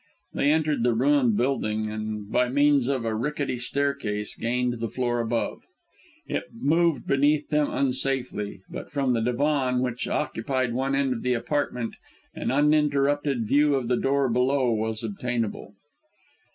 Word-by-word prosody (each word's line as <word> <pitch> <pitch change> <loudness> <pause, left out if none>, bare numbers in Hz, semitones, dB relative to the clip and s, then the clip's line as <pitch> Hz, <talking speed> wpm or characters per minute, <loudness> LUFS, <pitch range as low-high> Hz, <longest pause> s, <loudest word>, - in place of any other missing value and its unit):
They 145 - +2
entered 155 -3 +1
the 120 -1 +2
ruined 130 -3 +3
building 110 -4 0
and, 110 -1 -5
by 125 0 +2
means 145 -1 +3
of 135 -4 -1
a 110 - -1
rickety 135 +2 -2
staircase, 125 -6 -1
gained 120 0 -1
the 115 -1 -2
floor 120 0 -1
above. 115 0 -2 0.6
It - - -3
moved 155 0 +2
beneath 145 +2 +2
them 150 -1 +2
unsafely, 130 -7 -1
but - - -8
from 135 -3 +1
the 115 - +1
divan 125 +1 +1
which 125 -1 -2
occupied 130 -2 -1
one 135 +2 0
end 135 -2 +1
of 115 - -5
the 125 0 +1
apartment 125 -2 -2 0.4
an - - -3
uninterrupted 145 -2 +2
view 145 +5 +3
of 125 -3 -2
the 125 - +3
door 135 +2 +1
below 125 +1 +2
was 110 0 -2
obtainable. 115 -1 -3
125 Hz, 150 wpm, -25 LUFS, 115-140 Hz, 0.6 s, ruined